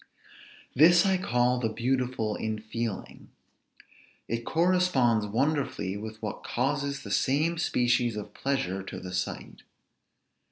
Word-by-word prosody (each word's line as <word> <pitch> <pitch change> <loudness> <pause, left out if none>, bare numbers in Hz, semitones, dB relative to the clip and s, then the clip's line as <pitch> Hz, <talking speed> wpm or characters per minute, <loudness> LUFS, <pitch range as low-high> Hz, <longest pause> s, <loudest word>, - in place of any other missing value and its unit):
This 170 +6 +6
I 190 -1 +3
call 125 -5 +1
the 115 -2 0
beautiful 120 -1 -1
in 110 0 -3
feeling. 110 -1 -5 1.0
It 115 0 -3
corresponds 160 - +2
wonderfully 130 -4 -1
with 110 +1 -7
what 105 - -5
causes 140 +2 -1
the 100 - -7
same 155 +9 +1
species 120 -6 +1
of 105 - -7
pleasure 115 -9 -1
to 95 - -7
the 90 0 -8
sight. 90 - -4
120 Hz, 120 wpm, -28 LUFS, 110-140 Hz, 1.0 s, This